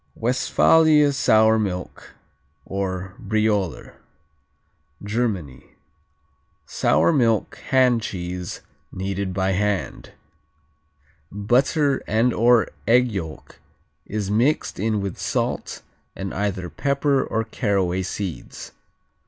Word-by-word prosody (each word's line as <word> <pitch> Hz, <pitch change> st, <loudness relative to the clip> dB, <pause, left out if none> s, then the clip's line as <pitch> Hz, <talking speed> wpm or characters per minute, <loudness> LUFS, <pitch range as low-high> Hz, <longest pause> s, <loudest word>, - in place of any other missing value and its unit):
Westphalia 150 Hz, +5 st, +3 dB
Sour 110 Hz, -3 st, +4 dB
Milk, 90 Hz, -4 st, -5 dB, 0.5 s
or 95 Hz, -1 st, -4 dB
Brioler 105 Hz, -5 st, -1 dB, 1.1 s
Germany 100 Hz, -, -3 dB, 0.9 s
Sour 80 Hz, +4 st, +2 dB
milk 115 Hz, -5 st, +1 dB
hand 125 Hz, -3 st, +4 dB
cheese, 90 Hz, -3 st, -5 dB, 0.3 s
kneaded 95 Hz, 0 st, -3 dB
by 95 Hz, 0 st, 0 dB
hand. 100 Hz, +1 st, -2 dB, 1.2 s
Butter 130 Hz, -, +1 dB
and/or 115 Hz, +1 st, +3 dB, 0.2 s
egg 125 Hz, +1 st, +4 dB
yolk 80 Hz, -6 st, -7 dB, 0.5 s
is 105 Hz, -1 st, -3 dB
mixed 120 Hz, +4 st, +1 dB
in 105 Hz, 0 st, 0 dB
with 100 Hz, -2 st, -5 dB
salt, -, -, -3 dB, 0.3 s
and 95 Hz, 0 st, -5 dB
either 95 Hz, -3 st, -2 dB
pepper 140 Hz, -, 0 dB
or 110 Hz, -, -2 dB
caraway 100 Hz, -5 st, -1 dB
seeds. 95 Hz, -1 st, -6 dB
105 Hz, 85 wpm, -22 LUFS, 95-120 Hz, 1.2 s, Sour